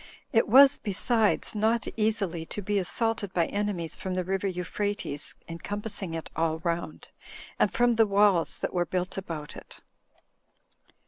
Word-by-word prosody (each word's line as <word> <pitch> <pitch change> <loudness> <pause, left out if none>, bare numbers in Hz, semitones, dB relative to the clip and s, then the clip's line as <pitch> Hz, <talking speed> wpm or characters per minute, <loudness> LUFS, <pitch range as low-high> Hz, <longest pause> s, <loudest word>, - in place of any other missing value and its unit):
It 225 - +4
was, 270 +4 +8
besides, 215 +2 +1
not 220 +2 +1
easily 210 -6 -1
to 210 - -4
be 205 +1 0
assaulted 205 +1 -1
by 170 -2 +3
enemies, 200 -5 -3
from 185 -1 -4
the 185 - 0
river 195 +2 -1
Euphrates 185 -3 -2
encompassing 195 +1 -4
it 165 - -6
all 160 -1 0
round, 170 -1 -3 0.5
and - - +3
from 240 0 +3
the 225 -1 +4
wails 200 -4 +3
that - - -3
were 175 -1 +1
built 185 +2 -2
about 160 -5 -7
it. - - -12
195 Hz, 145 wpm, -27 LUFS, 175-215 Hz, 0.5 s, was